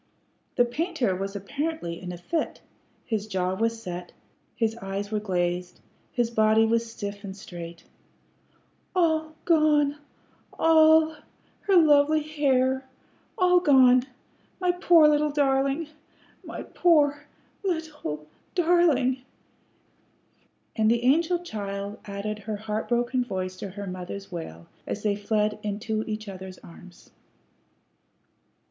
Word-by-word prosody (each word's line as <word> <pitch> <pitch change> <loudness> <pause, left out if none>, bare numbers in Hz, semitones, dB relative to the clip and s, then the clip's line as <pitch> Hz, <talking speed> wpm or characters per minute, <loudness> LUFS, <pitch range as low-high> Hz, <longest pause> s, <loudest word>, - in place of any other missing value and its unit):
The 245 - +4
painter 270 - -1
was 195 +2 -4
apparently 200 - -4
in 180 -1 -6
a 175 - -7
fit; 315 - -3 0.5
his 215 -2 -2
jaw 185 -2 -1
was 230 +3 -1
set, 175 0 -6 0.4
his 225 -1 0
eyes 200 -1 -5
were 215 - 0
glazed, 180 -3 -2 0.3
his 240 -1 0
body 220 0 +4
was 230 0 0
stiff 205 -2 -6
and 195 -1 -7
straight. 170 -3 -9 1.1
"All 315 -3 +1
gone 300 -3 +3 0.6
all 315 -1 +5 0.5
her 390 - +4
lovely 305 -1 +5
hair 265 -3 +1 0.5
all 360 -1 +5
gone 260 -6 +5 0.5
my 360 -1 +2
poor 345 -3 +5
little 300 0 +3
darlin' 275 +1 +1 0.6
my - - -7
poor 295 -4 +2 0.4
little 310 - -3 0.3
darlin'!" 325 -8 +3 1.6
And 220 0 +3
the 235 +1 +2
angel 325 +7 +3
child 200 - -5
added 205 +1 -4
her 215 +1 -4
heart 215 +1 -4
broken 245 +1 +1
voice 185 -5 -4
to 195 - -6
her 200 +2 -7
mother's 185 +1 -7
wail 85 - -7 0.2
as 205 - -4
they 210 -1 +1
fled 210 +1 0
into 215 +1 -2
each 215 0 -4
other's 190 -1 -8
arms. 180 +2 -15
230 Hz, 120 wpm, -26 LUFS, 200-300 Hz, 1.6 s, all